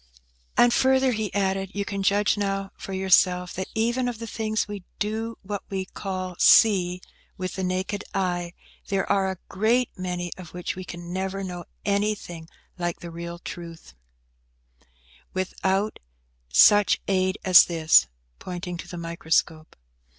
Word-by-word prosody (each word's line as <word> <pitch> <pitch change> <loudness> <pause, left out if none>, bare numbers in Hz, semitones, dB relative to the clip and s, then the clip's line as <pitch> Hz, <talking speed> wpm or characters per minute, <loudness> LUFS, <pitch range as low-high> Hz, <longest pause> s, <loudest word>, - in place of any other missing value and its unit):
"And, 240 0 +6
further," 265 0 +3
he 220 -3 -2
added, 195 -1 -1
"you 200 0 -1
can 200 -1 -3
judge 205 +2 +3
now 195 -1 -2
for - - -8
yourself, 180 -1 +3
that 190 0 -4
even 235 +3 +1
of 245 -2 -3
the 230 - -6
things 220 -1 -2
we 205 -3 -7
do 220 +2 -3
what 200 0 -4
we 190 -1 -3
call 185 -2 -5
see 180 -5 +5 0.4
with 185 0 -4
the 190 - -3
naked 185 +2 -2
eye, 175 -2 -1 0.3
there 195 -1 0
are 195 -1 +2
a 190 - -4
great 230 +5 +1
many 180 -1 -4
of 175 -2 -11
which 180 - -4
we 185 - -6
can 175 0 -8
never 190 +1 -3
know 180 -2 -6 0.2
anything 200 -5 -2 0.3
like 175 -1 -2
the 170 - -8
real 170 +1 -6
truth, 170 - -9 1.4
without 190 +2 -1 0.5
such 205 - +6
aid 185 -1 +1
as 185 -2 +9
this 160 - +4 0.3
(pointing 180 -1 -5
to 175 - -8
the 175 - -7
microscope). 165 -1 -1
190 Hz, 150 wpm, -25 LUFS, 175-205 Hz, 1.4 s, as